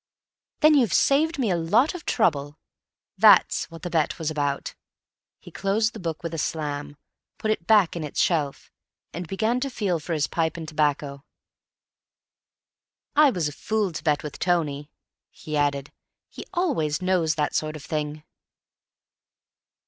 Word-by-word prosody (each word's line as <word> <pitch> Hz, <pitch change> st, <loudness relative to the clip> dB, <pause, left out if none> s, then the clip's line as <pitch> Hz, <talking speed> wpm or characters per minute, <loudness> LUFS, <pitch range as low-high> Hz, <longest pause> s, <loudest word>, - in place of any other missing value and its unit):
"Then 305 Hz, 0 st, +7 dB
you've 245 Hz, -, +3 dB
saved 310 Hz, +4 st, +3 dB
me 240 Hz, -7 st, 0 dB
a -, -, +2 dB
lot 205 Hz, -, +2 dB
of 360 Hz, -, -9 dB
trouble. 145 Hz, -, +1 dB, 0.6 s
That's -, -, +5 dB
what 165 Hz, 0 st, -12 dB
the 175 Hz, -, -3 dB
bet 160 Hz, -3 st, 0 dB
was 160 Hz, -1 st, -2 dB
about." 145 Hz, -2 st, -2 dB, 0.6 s
He -, -, -14 dB
closed 215 Hz, +3 st, 0 dB
the 220 Hz, -, -8 dB
book 165 Hz, -4 st, -4 dB
with 165 Hz, -1 st, -4 dB
a 165 Hz, -, -3 dB
slam, 145 Hz, -1 st, -3 dB, 0.4 s
put 215 Hz, -, -1 dB
it 170 Hz, -6 st, -3 dB
back 210 Hz, -7 st, +4 dB
in 170 Hz, -, -4 dB
its 150 Hz, -, -5 dB
shelf, 150 Hz, -5 st, 0 dB, 0.4 s
and 175 Hz, +1 st, -5 dB
began 220 Hz, +7 st, 0 dB
to 275 Hz, +2 st, -2 dB
feel 195 Hz, -9 st, -1 dB
for 165 Hz, +3 st, -4 dB
his 150 Hz, -2 st, +1 dB
pipe 165 Hz, 0 st, -1 dB
and 160 Hz, -1 st, -6 dB
tobacco. 145 Hz, -2 st, -1 dB, 1.9 s
"I 300 Hz, 0 st, +7 dB
was 175 Hz, -, -1 dB
a -, -, -4 dB
fool 215 Hz, +2 st, -1 dB
to 160 Hz, -, -7 dB
bet 150 Hz, -2 st, +1 dB
with 150 Hz, -2 st, -7 dB
Tony," 150 Hz, -5 st, 0 dB, 0.4 s
he 155 Hz, -, -7 dB
added. 145 Hz, -1 st, 0 dB, 0.4 s
"He -, -, -10 dB
always 275 Hz, -, 0 dB
knows 175 Hz, -4 st, +1 dB
that 150 Hz, -1 st, -1 dB
sort 155 Hz, 0 st, -1 dB
of 150 Hz, -, -9 dB
thing." 150 Hz, -1 st, -3 dB
165 Hz, 160 wpm, -25 LUFS, 150-210 Hz, 1.9 s, Then